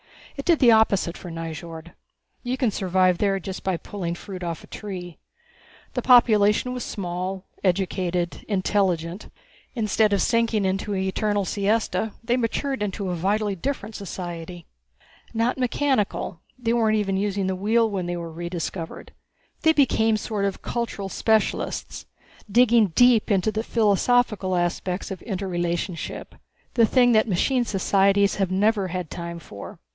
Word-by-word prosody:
It 275 Hz, -, -6 dB
did 340 Hz, -2 st, +4 dB
the 245 Hz, -5 st, +6 dB
opposite 200 Hz, -5 st, +3 dB
for 180 Hz, -, -9 dB
Nyjord. 165 Hz, 0 st, -7 dB, 0.5 s
You 250 Hz, +1 st, -2 dB
can 250 Hz, -4 st, +1 dB
survive 185 Hz, -2 st, +2 dB
there 195 Hz, -2 st, +1 dB
just 190 Hz, +1 st, -7 dB
by 190 Hz, -2 st, 0 dB
pulling 175 Hz, -2 st, -5 dB
fruit 185 Hz, +1 st, -8 dB
off 170 Hz, -2 st, -4 dB
a -, -, -14 dB
tree. 180 Hz, -5 st, -7 dB, 0.7 s
The 250 Hz, -, -1 dB
population 230 Hz, -1 st, +5 dB
was 250 Hz, -, -4 dB
small, 185 Hz, 0 st, -4 dB, 0.2 s
educated, 180 Hz, -2 st, -1 dB
intelligent. 185 Hz, -3 st, 0 dB, 0.5 s
Instead 215 Hz, -2 st, +2 dB
of 200 Hz, -, +2 dB
sinking 230 Hz, -3 st, +1 dB
into 195 Hz, +2 st, -1 dB
an 190 Hz, -, -1 dB
eternal 205 Hz, +1 st, 0 dB
siesta 215 Hz, +2 st, 0 dB
they 240 Hz, +2 st, +1 dB
matured 255 Hz, +1 st, -1 dB
into 200 Hz, -1 st, -2 dB
a -, -, -1 dB
vitally 200 Hz, +4 st, 0 dB
different 220 Hz, +1 st, -4 dB
society. 175 Hz, -4 st, -7 dB, 0.7 s
Not 230 Hz, +3 st, +1 dB
mechanical 250 Hz, -, 0 dB, 0.2 s
they 235 Hz, -2 st, 0 dB
weren't 220 Hz, -2 st, +2 dB
even 195 Hz, -2 st, 0 dB
using 200 Hz, -1 st, -1 dB
the 190 Hz, 0 st, -1 dB
wheel 225 Hz, +4 st, +2 dB
when 190 Hz, -4 st, -3 dB
they 175 Hz, 0 st, -2 dB
were 170 Hz, -1 st, -6 dB
rediscovered. 170 Hz, 0 st, -5 dB, 0.5 s
They 320 Hz, 0 st, +5 dB
became 225 Hz, -7 st, +3 dB
sort 210 Hz, -1 st, -2 dB
of 195 Hz, -1 st, -3 dB
cultural 230 Hz, -5 st, -3 dB
specialists, 220 Hz, +1 st, -1 dB, 0.4 s
digging 235 Hz, -1 st, +5 dB
deep 245 Hz, -2 st, +5 dB
into 200 Hz, +1 st, +2 dB
the 215 Hz, +1 st, -2 dB
philosophical 215 Hz, -3 st, +2 dB
aspects 180 Hz, +2 st, -2 dB
of 190 Hz, -, -6 dB
interrelationship 175 Hz, -3 st, -3 dB, 0.4 s
the 230 Hz, -2 st, +4 dB
thing 245 Hz, +1 st, +4 dB
that 220 Hz, -1 st, +4 dB
machine 240 Hz, +6 st, +1 dB
societies 200 Hz, 0 st, +2 dB
never 200 Hz, +1 st, +2 dB
have 180 Hz, -, -6 dB
had 180 Hz, -4 st, -4 dB
time 170 Hz, -1 st, -5 dB
for. 100 Hz, -11 st, -10 dB
200 Hz, 145 wpm, -24 LUFS, 180-225 Hz, 0.7 s, the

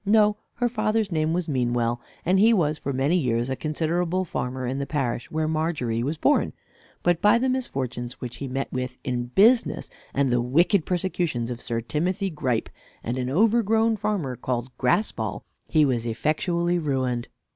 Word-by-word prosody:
No; 210 Hz, 0 st, +4 dB, 0.2 s
her 245 Hz, -, +1 dB
father's 215 Hz, -3 st, 0 dB
name 155 Hz, -1 st, +1 dB
was 175 Hz, 0 st, -1 dB
Meanwell; 120 Hz, -3 st, 0 dB, 0.2 s
and 185 Hz, +2 st, +3 dB
he 225 Hz, +3 st, +6 dB
was 155 Hz, -4 st, +1 dB
for 140 Hz, -, -3 dB
many 135 Hz, +6 st, +1 dB
years 125 Hz, -6 st, +1 dB
a -, -, 0 dB
considerable 170 Hz, +5 st, -1 dB
farmer 130 Hz, -4 st, -3 dB
in 130 Hz, +2 st, -2 dB
the 140 Hz, -, -3 dB
parish 130 Hz, -5 st, -2 dB
where 155 Hz, 0 st, -1 dB
Margery 155 Hz, -8 st, -1 dB
was 145 Hz, +6 st, -2 dB
born; 290 Hz, -, +2 dB, 0.5 s
but 175 Hz, -1 st, +2 dB
by 210 Hz, +3 st, +6 dB
the 255 Hz, +2 st, +1 dB
misfortunes 130 Hz, -, -2 dB
which 125 Hz, -1 st, -6 dB
he 140 Hz, -, -5 dB
met 135 Hz, +1 st, -3 dB
with 125 Hz, 0 st, -3 dB
in 125 Hz, -1 st, -2 dB
business, 220 Hz, -, +3 dB, 0.2 s
and 135 Hz, -2 st, +1 dB
the 120 Hz, 0 st, +3 dB
wicked 165 Hz, -, +2 dB
persecutions 175 Hz, -9 st, -1 dB
of 120 Hz, 0 st, -6 dB
Sir 115 Hz, -1 st, -2 dB
Timothy 180 Hz, -, -1 dB
Gripe, 130 Hz, -7 st, -1 dB, 0.3 s
and 120 Hz, -, -2 dB
an 125 Hz, 0 st, -1 dB
overgrown 225 Hz, -, +3 dB
farmer 205 Hz, -11 st, -2 dB
called 125 Hz, +1 st, -3 dB
Graspall, 125 Hz, -, 0 dB, 0.2 s
he 155 Hz, -2 st, +4 dB
was 120 Hz, -4 st, 0 dB
effectually 170 Hz, +8 st, 0 dB
ruined. 130 Hz, -6 st, -1 dB
150 Hz, 170 wpm, -25 LUFS, 125-185 Hz, 0.5 s, he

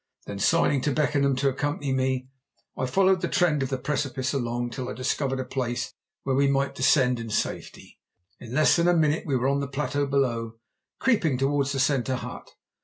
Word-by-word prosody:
Then, 100 Hz, -1 st, -6 dB
signing 140 Hz, +3 st, +3 dB
to 145 Hz, -, 0 dB
Beckenham 140 Hz, -2 st, +1 dB
to 135 Hz, +2 st, +1 dB
accompany 145 Hz, 0 st, -2 dB
me, 130 Hz, -1 st, -1 dB, 0.5 s
I 130 Hz, -, -2 dB
followed 190 Hz, +6 st, +3 dB
the -, -, 0 dB
trend 170 Hz, -6 st, +2 dB
of 135 Hz, -, -1 dB
the 135 Hz, -, -1 dB
precipice 135 Hz, -1 st, -2 dB
along 120 Hz, -2 st, -2 dB
till 125 Hz, +1 st, -5 dB
I -, -, -4 dB
discovered 130 Hz, +3 st, -1 dB
a 130 Hz, -, -3 dB
place 125 Hz, -2 st, -3 dB, 0.3 s
where 135 Hz, -1 st, 0 dB
we 140 Hz, +1 st, +3 dB
might 140 Hz, 0 st, +1 dB
descend 130 Hz, -2 st, +3 dB
in 115 Hz, -1 st, -6 dB
safety. 105 Hz, -, -4 dB, 0.4 s
In 115 Hz, -, -10 dB
less 155 Hz, +4 st, +4 dB
than 170 Hz, 0 st, +2 dB
a 175 Hz, -, +4 dB
minute 155 Hz, +1 st, +1 dB
we 135 Hz, -3 st, +1 dB
were 125 Hz, +2 st, 0 dB
on 140 Hz, +1 st, +1 dB
the 140 Hz, -, -2 dB
plateau 145 Hz, +1 st, -2 dB
below, 120 Hz, -5 st, -1 dB, 0.4 s
creeping 175 Hz, -, +2 dB
towards 140 Hz, +1 st, +1 dB
the 135 Hz, -, -2 dB
centre 130 Hz, -1 st, +1 dB
hut. -, -, -7 dB
135 Hz, 195 wpm, -26 LUFS, 130-145 Hz, 0.5 s, less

